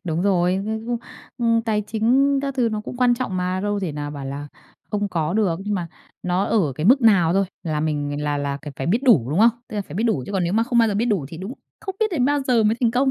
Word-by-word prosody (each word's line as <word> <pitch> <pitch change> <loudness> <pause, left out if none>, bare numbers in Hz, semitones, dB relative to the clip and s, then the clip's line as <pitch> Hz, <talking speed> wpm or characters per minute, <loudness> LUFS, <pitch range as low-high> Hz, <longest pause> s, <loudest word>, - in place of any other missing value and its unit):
Đúng 165 -1 -1
rồi, 180 -2 +2
ư, 220 +1 -4
ư, 240 0 -1 0.4
ư, 230 -1 +2
tài 215 -2 +1
chính 250 +6 +2
các 275 -1 -3
thứ 245 -3 +2
nó 215 - -2
cũng 245 - -8
quan 245 -1 +3
trọng 235 -7 -3
mà, 180 +1 -1
đâu 205 0 -1
thể 170 -6 -3
nào 145 0 -5
bảo 140 -2 -7
là 140 +2 -6 0.4
không 205 -1 -1
có 165 -3 -1
được, 190 -5 +1
nhưng 210 0 -1
mà 175 -3 -3 0.3
nó 180 +2 0
ở 190 -12 +1
cái 155 +4 -2
mức 260 +3 +5
nào 185 -7 +5
thôi 195 +2 +2 0.2
là 155 -3 -2
mình 145 -1 -2
là 145 -1 0
là 140 -1 -2
cần 150 - -7
phải 135 - -4
biết 225 +9 +1
đủ, 155 - +4
đúng 160 - 0
không? 230 +2 +7 0.2
Tức 215 - -6
là 205 - -1
phải 155 - -11
biết 215 +6 -1
đủ 220 - +1
chứ - - -6
còn 190 -3 0
nếu 170 - -1
mà 225 +2 +3
không 240 0 0
bao 225 -1 +5
giờ 205 - -1
biết 215 +3 +1
đủ 195 - 0
thì 165 - -9
đúng 195 +8 -6 0.3
không 385 - -5
biết 440 - +4
đến 275 -8 +1
bao 290 +1 +2
giờ 240 -3 +3
mới 215 +1 +3
thành 235 - +3
công, 265 +3 +2
205 Hz, 295 wpm, -22 LUFS, 165-230 Hz, 0.4 s, không